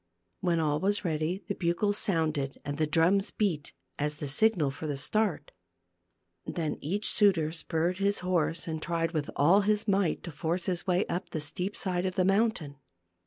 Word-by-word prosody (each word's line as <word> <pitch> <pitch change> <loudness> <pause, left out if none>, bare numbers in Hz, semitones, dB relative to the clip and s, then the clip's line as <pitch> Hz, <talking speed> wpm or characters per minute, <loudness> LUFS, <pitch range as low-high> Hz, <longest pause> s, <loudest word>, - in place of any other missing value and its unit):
When 170 -2 +1
all 150 -2 +1
was 205 +3 0
ready 165 +4 -1
the - - -1
bugles 185 +4 0
sounded 155 -6 0
and 145 +1 -4
the 155 - +2
drums 175 +6 +3
beat, 175 -9 -1 0.3
as 150 +1 -1
the 145 0 -5
signal 155 -1 +3
for 155 +3 -6
the 145 -2 -2
start. 205 +4 -1 0.9
Then 160 -3 -3
each 200 +8 -1
suitor 180 -7 +3
spurred 165 +2 -2
his 200 +1 +2
horse 170 -2 0
and 160 -1 -3
tried 165 -1 -1
with 155 -4 -2
all 175 +8 +5
his 210 +2 +1
might 195 -4 +1
to 170 - -6
force 165 +4 -2
his 180 -1 -1
way 180 +2 +2
up 175 - -4
the 155 - -3
steep 180 +7 -3
side 180 -1 0
of 185 - -4
the 185 - +2
mountain. 195 -8 +1
170 Hz, 180 wpm, -29 LUFS, 155-195 Hz, 0.9 s, all